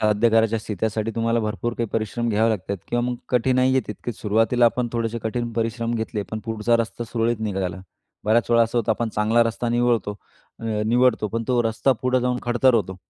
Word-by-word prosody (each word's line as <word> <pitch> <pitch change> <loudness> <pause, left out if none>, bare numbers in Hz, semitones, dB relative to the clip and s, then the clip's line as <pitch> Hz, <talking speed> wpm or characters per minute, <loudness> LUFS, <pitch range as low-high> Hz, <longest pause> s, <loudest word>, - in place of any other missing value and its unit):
साध्य 110 +2 +3
करायची 115 0 +3
असते 110 -1 -3
त्यासाठी 110 0 -1
तुम्हाला 115 0 +1
भरपूर 110 +2 -2
काही 115 - 0
परिश्रम 115 +2 -1
घ्यावे 110 +1 +2
लागतात 100 -2 -2
किंवा 120 - 0
मग 125 - -2
कठिनाई 130 +1 +2
येते, 130 - +3
तितकेच 120 -4 -6
सुरुवातीला 115 +3 +2
आपण 120 +1 +2
थोडेसे 115 -1 -2
कठीण 120 +1 -2
परिश्रम 115 +1 -1
घेतले 110 -2 -2
पण 110 - -3
पुढचा 115 +1 +1
रस्ता 115 +1 -3
सुरळीत 115 0 -1
निघाला. 95 -4 -2 0.4
बऱ्याच 115 +2 +2
वेळा 115 0 +5
असं 115 +1 0
होतं, 115 0 0
आपण 115 +1 -2
चांगला 110 +2 +2
रस्ता 115 +1 -2
निवळतो 120 -4 +1 0.4
अ, - - -8 0.2
निवडतो 120 -2 +3
पण 115 +3 -2
तो 125 -1 +3
रस्ता 115 +4 +1
पुढं 130 0 +2
जाऊन 125 0 0
खडतर 120 +1 +3
होतो. 95 -4 0
115 Hz, 195 wpm, -23 LUFS, 110-120 Hz, 0.4 s, वेळा